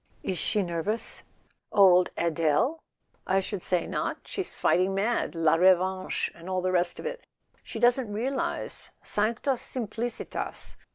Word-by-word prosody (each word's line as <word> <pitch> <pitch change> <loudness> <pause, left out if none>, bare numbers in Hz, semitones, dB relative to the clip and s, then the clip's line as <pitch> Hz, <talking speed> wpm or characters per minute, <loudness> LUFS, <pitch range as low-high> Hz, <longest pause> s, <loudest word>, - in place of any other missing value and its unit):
"Is 185 -3 -2
she—nervous?" 200 +2 -1 0.5
"Old 185 -3 +6
Adele? 170 - +1 0.5
I 190 +1 +3
should 195 0 -4
say 180 -1 0
not: - - -2
she's 385 -2 -4
fighting 185 +2 +2
mad. 210 -1 0
La 165 -2 +3
Revanche 185 +2 +2
and 170 +2 -11
all 185 0 0
the 185 - +1
rest 175 -1 +1
of - - -7
it. - - -4 0.4
She - - -8
doesn't 240 0 +3
realize 250 +6 -2
—sancta 225 +6 +1
simplicitas 235 -1 -3
195 Hz, 130 wpm, -28 LUFS, 180-230 Hz, 0.5 s, Old